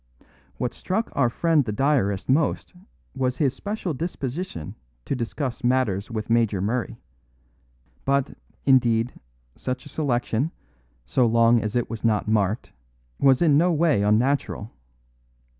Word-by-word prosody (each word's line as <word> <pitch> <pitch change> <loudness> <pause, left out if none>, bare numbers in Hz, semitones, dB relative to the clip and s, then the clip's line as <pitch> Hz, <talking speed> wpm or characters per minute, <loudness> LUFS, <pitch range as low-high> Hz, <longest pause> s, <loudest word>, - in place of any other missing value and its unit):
What 125 - -2
struck 220 +5 -2
our 130 -4 +2
friend 160 +3 +2
the 115 - -3
diarist 105 -5 +1
most 145 +4 +1 0.4
was 130 -1 -1
his 135 -4 +2
special 200 +2 -4
disposition 140 - -4 0.3
to - - -1
discuss 125 +2 -4
matters 120 -6 +1
with 110 -2 -4
Major 115 -4 +2
Murray; 115 +6 -2 1.1
but, 140 0 0 0.3
indeed, 120 -3 +3 0.4
such 130 0 -4
a - - -10
selection, 130 -2 0 0.6
so 125 -2 +2
long 115 0 +4
as 110 +1 -3
it 120 - +1
was 115 -2 -7
not 110 -2 +1
marked, 105 +1 0 0.5
was 135 +3 +4
in 150 -3 +5
no 175 +2 +3
way 160 -8 +2
unnatural. 110 +1 +1
125 Hz, 130 wpm, -24 LUFS, 115-140 Hz, 1.1 s, in